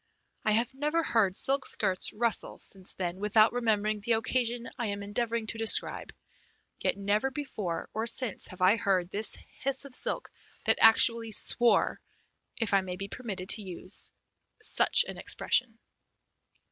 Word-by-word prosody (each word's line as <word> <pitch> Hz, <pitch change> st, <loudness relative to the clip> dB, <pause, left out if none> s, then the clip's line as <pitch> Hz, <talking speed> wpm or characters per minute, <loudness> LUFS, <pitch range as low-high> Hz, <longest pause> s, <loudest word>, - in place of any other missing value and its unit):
I 215 Hz, -, +2 dB
have 235 Hz, +4 st, 0 dB
never 300 Hz, +5 st, -1 dB
heard 205 Hz, -9 st, +1 dB
silk 270 Hz, +4 st, +4 dB
skirts 185 Hz, -1 st, +1 dB
rustle 230 Hz, 0 st, +1 dB
since 190 Hz, -1 st, -5 dB
then 180 Hz, -1 st, -4 dB
without 215 Hz, +2 st, +3 dB
remembering 215 Hz, -3 st, 0 dB
the 230 Hz, +3 st, 0 dB
occasion 235 Hz, +1 st, -1 dB
I 235 Hz, -, -1 dB
am 200 Hz, 0 st, -4 dB
endeavouring 230 Hz, +2 st, -2 dB
to 225 Hz, +1 st, -5 dB
describe; 225 Hz, -1 st, +3 dB, 0.7 s
yet -, -, -1 dB
never 205 Hz, +6 st, 0 dB
before 215 Hz, -, -5 dB
or 220 Hz, +1 st, -3 dB
since 235 Hz, -2 st, -1 dB
have 185 Hz, 0 st, -6 dB
I 195 Hz, +5 st, +5 dB
heard 185 Hz, -4 st, 0 dB
the 215 Hz, +2 st, 0 dB, 0.2 s
hiss 275 Hz, +1 st, -2 dB
of 275 Hz, -, -11 dB
silk -, -, +1 dB, 0.3 s
that -, -, +2 dB
actually 225 Hz, 0 st, +4 dB
swore, 235 Hz, +3 st, +3 dB, 0.6 s
if 225 Hz, -3 st, -1 dB
I 195 Hz, -, +4 dB
may 185 Hz, -1 st, -6 dB
be 195 Hz, +2 st, -7 dB
permitted 200 Hz, -7 st, -7 dB
the 215 Hz, -, -1 dB
use 185 Hz, 0 st, -3 dB, 0.5 s
of -, -, -12 dB
such -, -, +3 dB
an -, -, -8 dB
expression. 230 Hz, -3 st, -1 dB
220 Hz, 160 wpm, -29 LUFS, 200-240 Hz, 0.7 s, I